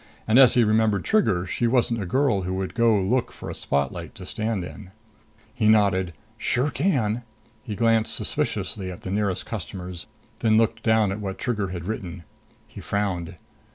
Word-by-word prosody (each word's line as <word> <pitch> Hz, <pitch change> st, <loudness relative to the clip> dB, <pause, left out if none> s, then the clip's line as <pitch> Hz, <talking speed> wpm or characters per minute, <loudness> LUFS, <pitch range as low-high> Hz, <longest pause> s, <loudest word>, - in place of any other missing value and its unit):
And 110 Hz, +4 st, +5 dB
as 130 Hz, -3 st, +7 dB
he 120 Hz, -, +5 dB
remembered 110 Hz, -2 st, +2 dB
Trigger, 105 Hz, -, +2 dB
she 120 Hz, +5 st, 0 dB
wasn't 120 Hz, -2 st, +1 dB
a 95 Hz, -, -4 dB
girl 125 Hz, -1 st, +2 dB
who'd 95 Hz, +1 st, -3 dB
go 115 Hz, -3 st, +3 dB
look 115 Hz, +6 st, 0 dB
for -, -, -8 dB
a -, -, -5 dB
spotlight 70 Hz, -2 st, -2 dB
to -, -, -9 dB
stand 110 Hz, -4 st, -2 dB
in. 95 Hz, +1 st, -10 dB, 0.6 s
He 105 Hz, -, +1 dB
nodded. 100 Hz, -5 st, +3 dB, 0.3 s
"Sure 135 Hz, +4 st, +1 dB
can!" 125 Hz, -, 0 dB, 0.4 s
He 105 Hz, -, -6 dB
glanced 115 Hz, 0 st, +2 dB
suspiciously 95 Hz, -3 st, -2 dB
at 90 Hz, -, -10 dB
the 95 Hz, -, -4 dB
nearest 100 Hz, -2 st, -1 dB
customers, 90 Hz, -4 st, -6 dB, 0.3 s
then 110 Hz, -1 st, +3 dB
looked 115 Hz, 0 st, +2 dB
down 110 Hz, -3 st, +3 dB
at 100 Hz, -, -4 dB
what 95 Hz, -2 st, -4 dB
Trigger 105 Hz, -5 st, -1 dB
had 90 Hz, -2 st, -6 dB
written. 95 Hz, -4 st, -5 dB, 0.4 s
He -, -, -10 dB
frowned. 95 Hz, -4 st, -2 dB
105 Hz, 170 wpm, -24 LUFS, 95-115 Hz, 0.6 s, as